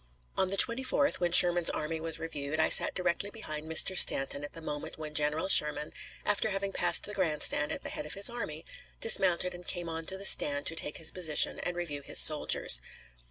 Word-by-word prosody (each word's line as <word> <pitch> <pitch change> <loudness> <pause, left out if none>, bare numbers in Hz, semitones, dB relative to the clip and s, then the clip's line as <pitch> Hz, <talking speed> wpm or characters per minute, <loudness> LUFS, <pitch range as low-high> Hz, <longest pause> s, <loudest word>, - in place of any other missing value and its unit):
On 190 - -1
the 195 +2 -1
24th, 265 +6 0
when 175 -1 -2
Sherman's 175 -1 +5
army 160 +1 -6
was 160 0 -2
reviewed, 155 -1 -6
I 160 - +1
sat - - +7
directly 180 +2 -2
behind 155 -8 -8
Mr. 185 +4 +3
Stanton 140 -3 +4
at 145 - -10
the - - -11
moment 150 -2 -9
when 155 -1 -10
General 150 +3 -3
Sherman, 150 -4 +2 0.3
after 205 +1 0
having 195 0 -4
passed 175 -2 0
the 210 - -6
grand 165 -7 -3
stand 150 - +1
at - - -7
the - - -8
head 150 - -8
of - - -8
his 200 0 0
army, 170 -10 -7 0.3
dismounted 180 -5 +2
and 175 0 -13
came 175 -2 -5
on 165 0 -8
to 190 - -5
the 200 - -11
stand 145 -5 +3
to 165 - -3
take 150 -2 -4
his 160 -1 -1
position 160 -5 0
and 175 - -6
review 150 -5 -6
his - - -2
soldiers. 150 - +4
165 Hz, 210 wpm, -28 LUFS, 150-190 Hz, 0.3 s, sat